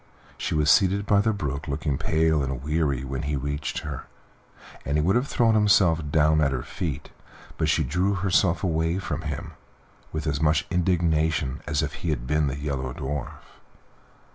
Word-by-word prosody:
She -, -, -3 dB
was 75 Hz, +1 st, +4 dB
seated 100 Hz, +1 st, +3 dB
by 100 Hz, -1 st, +4 dB
the 110 Hz, +1 st, +2 dB
brook 75 Hz, -8 st, -4 dB
looking 70 Hz, -1 st, -2 dB
pale 80 Hz, -1 st, +2 dB
and 65 Hz, -1 st, -3 dB
weary 75 Hz, -4 st, 0 dB
when 65 Hz, 0 st, -4 dB
he 75 Hz, -1 st, -2 dB
reached 70 Hz, +2 st, -3 dB
her, -, -, -6 dB, 0.8 s
and 70 Hz, +2 st, -1 dB
he 75 Hz, -, +2 dB
would 95 Hz, +6 st, +2 dB
have 125 Hz, +3 st, +1 dB
thrown 115 Hz, -6 st, +2 dB
himself 100 Hz, -6 st, +4 dB
down 75 Hz, +1 st, +3 dB
at 70 Hz, -2 st, +2 dB
her 65 Hz, -3 st, -2 dB
feet, 80 Hz, -8 st, -5 dB, 0.4 s
but 80 Hz, -1 st, 0 dB
she 80 Hz, 0 st, +2 dB
drew 90 Hz, +9 st, 0 dB
herself 90 Hz, -2 st, +2 dB
away 80 Hz, -1 st, 0 dB
from 95 Hz, -, -3 dB
him 75 Hz, -4 st, -5 dB, 0.6 s
with 80 Hz, -, -4 dB
as 75 Hz, -1 st, -1 dB
much 75 Hz, -1 st, +2 dB
indignation 80 Hz, -5 st, +1 dB
as 75 Hz, +1 st, 0 dB
if 70 Hz, 0 st, -3 dB
he 85 Hz, -, -2 dB
had 75 Hz, -5 st, -2 dB
been 75 Hz, +2 st, +1 dB
the 70 Hz, 0 st, -3 dB
Yellow 70 Hz, -3 st, -3 dB
Dwarf. 70 Hz, +1 st, -5 dB
75 Hz, 180 wpm, -25 LUFS, 70-85 Hz, 0.8 s, was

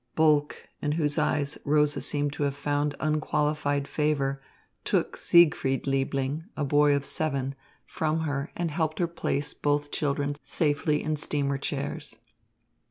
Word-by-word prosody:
Bulke, 150 Hz, -2 st, +2 dB
in 150 Hz, 0 st, 0 dB
whose 150 Hz, -2 st, +1 dB
eyes 145 Hz, 0 st, 0 dB
Rosa 150 Hz, 0 st, +2 dB
seemed 145 Hz, -1 st, -1 dB
to 150 Hz, -, -6 dB
have 140 Hz, -1 st, 0 dB
found 145 Hz, 0 st, -1 dB
unqualified 150 Hz, -2 st, 0 dB
favour, 140 Hz, -3 st, 0 dB, 0.4 s
took -, -, 0 dB
Siegfried 165 Hz, -6 st, +4 dB
Liebling, 135 Hz, +2 st, -1 dB
a 150 Hz, -, 0 dB
boy 145 Hz, +1 st, +4 dB
of 140 Hz, 0 st, -1 dB
seven, 140 Hz, -3 st, -1 dB, 0.3 s
from 160 Hz, 0 st, -1 dB
her 145 Hz, -3 st, -1 dB
hand -, -, -16 dB
and 170 Hz, -2 st, -1 dB
helped 155 Hz, 0 st, -1 dB
her 175 Hz, -, +2 dB
place 150 Hz, -3 st, -2 dB
both 145 Hz, 0 st, 0 dB
children 145 Hz, -1 st, 0 dB
safely 150 Hz, -1 st, +1 dB
in 155 Hz, 0 st, -1 dB
steamer 140 Hz, -2 st, 0 dB
chairs. -, -, -4 dB
145 Hz, 145 wpm, -27 LUFS, 140-155 Hz, 0.4 s, Siegfried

